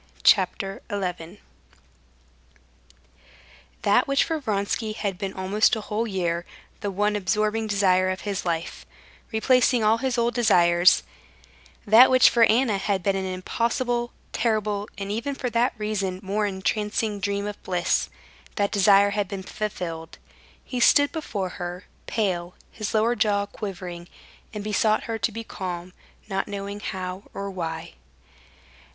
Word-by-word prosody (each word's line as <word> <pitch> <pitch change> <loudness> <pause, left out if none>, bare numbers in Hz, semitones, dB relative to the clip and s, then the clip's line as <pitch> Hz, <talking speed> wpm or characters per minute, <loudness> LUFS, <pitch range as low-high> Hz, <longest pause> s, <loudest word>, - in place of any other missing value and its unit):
Chapter 195 0 +3
11 180 -3 -4 2.5
That - - +3
which 275 0 +3
for 320 -1 -2
Vronsky 215 -2 -2
had 200 -3 -3
been 195 -2 -3
almost 195 +4 +2
a 220 - -4
whole 215 +2 -2
year 175 -4 -1 0.4
the 205 - -3
one 205 +2 0
absorbing 215 +2 0
desire 185 -2 +3
of 185 0 -3
his 200 -2 -3
life, 170 -1 -3 0.5
replacing 245 +1 +3
all 220 +2 +3
his 255 0 -1
old 235 0 +1
desires; 175 -6 +4 0.8
that 225 +5 +8
which 255 -1 +6
for 235 -1 +5
Anna 225 -3 +2
had 195 -2 -1
been 195 +1 +1
an 190 0 -2
impossible, 240 +6 -1 0.2
terrible, 215 -2 0
and 200 0 -4
even 235 +6 -2
for 250 -2 -3
that 235 +2 +1
reason 200 -3 -2
more 205 +2 0
entrancing 210 +2 -1
dream 200 0 -1
of 210 0 -6
bliss, 180 -2 0 0.5
that 200 -2 0
desire 200 0 +5
had 205 -1 -1
been 190 +1 -6
fulfilled. 175 -6 -5 0.5
He 250 - -4
stood 285 +4 +5
before 205 - -3
her, 175 +1 -5 0.2
pale, 180 -5 -1 0.2
his 215 +1 -4
lower 225 +2 +3
jaw 205 -3 +1
quivering, 180 -4 -7 0.4
and 210 -2 -6
besought 215 +1 +1
her 225 -1 -4
to 225 - 0
be 230 +2 -6
calm, 180 -3 -6 0.3
not 195 -2 -2
knowing 200 0 -5
how 185 -1 -5
or 200 0 -4
why. 165 -3 -5
205 Hz, 140 wpm, -25 LUFS, 185-220 Hz, 2.5 s, that